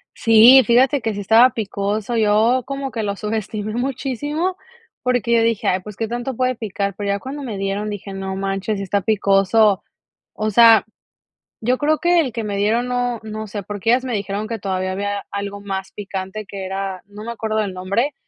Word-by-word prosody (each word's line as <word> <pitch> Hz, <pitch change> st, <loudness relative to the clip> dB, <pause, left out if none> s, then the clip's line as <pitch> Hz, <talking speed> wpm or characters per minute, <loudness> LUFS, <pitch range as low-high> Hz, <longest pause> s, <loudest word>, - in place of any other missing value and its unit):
Sí, 230 Hz, +4 st, +7 dB
fíjate 260 Hz, +4 st, +3 dB
que 225 Hz, -1 st, -1 dB
si 205 Hz, -, -5 dB
estaba 225 Hz, +5 st, +6 dB
picoso, 210 Hz, +1 st, -2 dB
yo 220 Hz, +4 st, +3 dB
como 275 Hz, 0 st, -4 dB
que 225 Hz, -3 st, -3 dB
lo 200 Hz, -1 st, -2 dB
subestimé 215 Hz, 0 st, -4 dB
muchísimo, 275 Hz, +8 st, -2 dB, 0.5 s
porque 245 Hz, -3 st, 0 dB
yo 230 Hz, -, +4 dB
dije: 230 Hz, -2 st, 0 dB
"Ay, 185 Hz, -, +2 dB
pues, 210 Hz, +2 st, -10 dB
¿qué 225 Hz, +3 st, -2 dB
tanto 240 Hz, +3 st, -4 dB
puede 255 Hz, +1 st, 0 dB
picar?". 200 Hz, -3 st, -3 dB
Pero 205 Hz, -1 st, -3 dB
ya 200 Hz, 0 st, 0 dB
cuando 275 Hz, +6 st, -7 dB
me 225 Hz, -6 st, -5 dB
dieron, 195 Hz, +2 st, -2 dB
dije: 200 Hz, -1 st, -6 dB
"No 190 Hz, 0 st, -4 dB
manches, 195 Hz, +2 st, -2 dB
sí 195 Hz, -, -4 dB
está 200 Hz, +1 st, 0 dB
picoso". 200 Hz, 0 st, +3 dB, 0.5 s
O 215 Hz, 0 st, -2 dB
sea, 225 Hz, 0 st, +7 dB, 0.8 s
yo 250 Hz, +3 st, +1 dB
creo 305 Hz, +1 st, +2 dB
que 345 Hz, 0 st, +3 dB
el 260 Hz, -7 st, -3 dB
que 230 Hz, -1 st, -3 dB
me 200 Hz, -1 st, -3 dB
dieron 225 Hz, +5 st, +1 dB
no 245 Hz, -1 st, -1 dB
no 215 Hz, 0 st, -6 dB
sé, 205 Hz, 0 st, -6 dB
porque 210 Hz, +3 st, -1 dB
ellas 255 Hz, +2 st, +2 dB
me 250 Hz, -, -3 dB
dijeron 205 Hz, 0 st, -3 dB
que 230 Hz, -1 st, -4 dB
todavía 185 Hz, -1 st, -2 dB
había 200 Hz, +1 st, -3 dB
algo 200 Hz, 0 st, -5 dB
más 195 Hz, -1 st, -5 dB
picante, 195 Hz, +1 st, -6 dB
que 195 Hz, -1 st, -6 dB
era, 190 Hz, -1 st, -4 dB
no 205 Hz, +1 st, -10 dB
me 235 Hz, -, -4 dB
acuerdo 220 Hz, -1 st, -2 dB
el 200 Hz, -3 st, -3 dB
nombre, 200 Hz, +10 st, -1 dB
215 Hz, 200 wpm, -20 LUFS, 200-240 Hz, 0.8 s, Sí